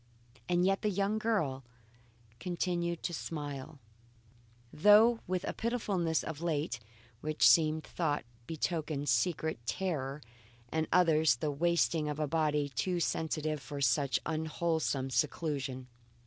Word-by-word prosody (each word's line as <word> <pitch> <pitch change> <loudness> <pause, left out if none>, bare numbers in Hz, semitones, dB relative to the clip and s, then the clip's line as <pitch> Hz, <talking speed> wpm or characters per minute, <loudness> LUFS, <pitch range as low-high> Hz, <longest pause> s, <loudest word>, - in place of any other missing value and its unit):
And 175 0 +3
yet 195 +1 +2
the 210 - +1
young 200 +2 0
girl 160 -13 0 0.8
continued 175 +1 -2
to 170 - -2
smile, 145 -2 -5 1.0
though 215 +7 +6
with 185 0 -1
a - - -3
pitifulness 200 -9 -1
of 160 -1 -6
late, 155 -6 -1 0.4
which 155 0 +3
some 155 -1 +5
thought 155 -4 -2 0.2
betokened 155 -2 -2
secret 160 -5 +1
terror 150 -6 -2 0.5
and 160 +2 -1
others 160 -5 +4
the 145 +5 -2
wasting 165 0 +1
of 150 0 -4
a 155 - +1
body 150 -1 0
too 180 +5 -1
sensitive 155 -2 -1
for 145 +1 -7
such 135 +1 +2
unwholesome 160 -3 -1
seclusion. 140 -3 -1
160 Hz, 120 wpm, -32 LUFS, 145-175 Hz, 1.0 s, though